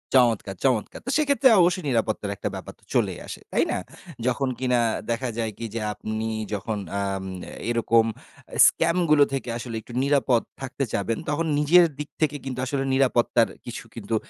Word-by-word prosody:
চমৎকার! 115 -6 +3
চমৎকার! 125 -6 +1
তো - - -4
সেক্ষেত্রে 280 -3 +4
অবশ্যই 175 -1 +2
নিরাপত্তার 110 -4 0
একটা - - -3
ব্যাপার - - -8
তো - - -31
চলেই - - +1
আসে, - - -7
তাই - - +3
না? - - 0 0.5
যখন 135 +2 +1
কিনা 125 -2 +2 0.3
দেখা 120 +2 -1
যায় 115 -2 -1
কি 115 - -5
যে 115 - -3
আপনি 110 +1 -4 0.3
যখন 105 +2 -2 0.2
আম 100 -1 -2 0.5
এরকম 115 -1 +3 0.6
স্ক্যামগুলো 165 -3 +4
থেকে 135 -2 -3
আসলে 120 -1 -6
একটু 120 - -13
নিরাপদ 135 -4 +3 0.2
থাকতে 135 +1 -3
চাবেন, 110 +3 -1
তখন 150 +3 0
নিজের 170 +4 +6
দিক 150 - -5
থেকে 150 -2 +2
কিন্তু 130 -2 -4
আসলে 135 +1 -1
নিরাপত্তার 125 -3 +3 0.2
কিছু 120 - -6
কিন্তু 115 -1 -3
125 Hz, 165 wpm, -25 LUFS, 115-145 Hz, 0.6 s, নিজের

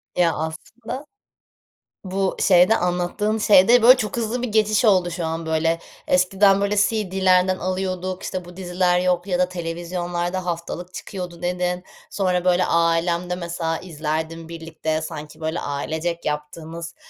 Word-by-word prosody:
Ya, 170 -2 +3
aslında 220 - -6 1.0
bu 190 0 -1
şeyde 185 +3 +5
anlattığın 180 +5 -1
şeyde, 215 +3 +6
böyle, 255 +3 +8
çok 215 -2 -3
hızlı 235 +2 -1
bir 250 - -1
geçiş 215 0 +2
oldu 185 -4 +4
şu 170 0 -3
an, 160 0 -3
böyle. 165 +1 +1 0.3
Eskiden, 195 +2 +4
böyle, 200 +1 +1
CD'lerden 190 -3 +2
alıyorduk. 185 0 -3
İşte, 185 -2 -4
bu 175 0 -13
diziler 180 -1 +1
yok 180 0 0
ya 180 -2 0
da 180 0 +2
televizyonlarda 175 +1 -3
haftalık 175 +1 -5
çıkıyordu, 180 -3 -7
dedin. 180 0 -1 0.3
Sonra, 185 -2 0
böyle, 180 0 +3
ailemle 170 +1 +1
mesela 170 -2 -3
izlerdim 160 -1 -4
birlikte, 160 -1 -3
sanki 155 -2 -8
böyle, 160 +1 -2
ailecek 160 +4 -3
yaptığınız, 160 +3 -5
180 Hz, 135 wpm, -22 LUFS, 165-190 Hz, 1.0 s, böyle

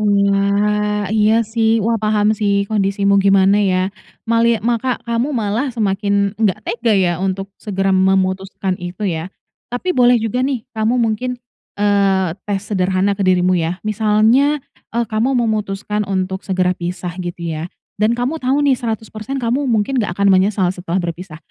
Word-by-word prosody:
Wah, 205 +1 +1
iya, 220 +1 +3
sih. 225 +1 +1
Wah, 230 +1 +2
paham 215 0 +2
sih 200 -2 +1
kondisimu 200 -1 +2
gimana 195 +1 +4
ya, 185 -1 +1 0.3
malia 230 0 +3
maka 240 +1 0
kamu 235 +5 -1
malah 225 +5 -1
semakin 200 -3 0
enggak 205 -5 +2
tega 230 -1 0
ya 180 -2 +2
untuk 195 +1 -3
segera 195 -2 -1
memutuskan 190 0 +1
itu 180 +3 -5
ya. 170 -3 -2 0.4
Tapi 245 +10 -2
boleh 245 -3 +4
juga 225 +2 -2
nih 260 -4 -1
kamu 220 +2 0
mungkin, 240 +2 -1 0.4
eee, 200 -3 +2 0.2
tes 200 -1 -2
sederhana 190 +1 +1
ke 200 - -6
dirimu 185 -1 +3
ya. 170 0 -1
Misalnya, 220 +7 +3 0.4
eee, 235 0 +1
kamu 225 +5 0
memutuskan 210 -2 -1
untuk 190 0 -2
segera 185 -1 +1
pisah 175 0 -5
gitu 175 -1 -6
ya. 160 0 -4 0.3
Dan 220 +3 +2
kamu 260 +7 -2
tahu 270 +3 +1
nih 280 - +4
100% 220 +2 -4
kamu 255 +3 -1
mungkin 235 +3 +1
enggak 190 -5 -3
akan 200 -1 +4
menyesal 190 -1 +2
setelah 180 -1 -4
berpisah. 175 -2 -4
205 Hz, 155 wpm, -18 LUFS, 190-230 Hz, 0.4 s, gimana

